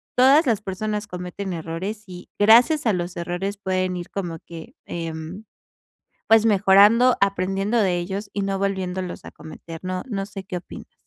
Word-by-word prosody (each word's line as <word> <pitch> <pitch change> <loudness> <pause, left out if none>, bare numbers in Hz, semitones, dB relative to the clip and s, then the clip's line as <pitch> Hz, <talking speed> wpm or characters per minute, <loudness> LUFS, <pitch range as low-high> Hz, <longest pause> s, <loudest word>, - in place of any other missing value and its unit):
todas 275 +6 +6
las 225 -4 +1
personas 210 +2 -4
cometen 180 +1 -6
errores. 175 +6 -5
Y 180 -1 -11
gracias 240 +9 +5
a 220 - +3
los 175 -1 -4
errores 180 +4 -3
pueden 185 -2 -1
ir 175 - -8
como 175 -4 -4
que, 170 - -11
em, 165 +4 -6 0.8
pues, 225 0 +5
mejorando, 210 +4 +5
aprendiendo 195 +3 0
de 185 -4 +2
ellos 195 +4 -5
y 200 - -2
no 195 0 -2
volviéndolos 190 -2 -3
a - - -9
cometer, 165 +1 -10
¿no? 185 0 -3
No 195 -4 -2
sé 195 -1 -8
qué 180 - -4
opinas. 175 - -11
195 Hz, 165 wpm, -23 LUFS, 180-210 Hz, 0.8 s, todas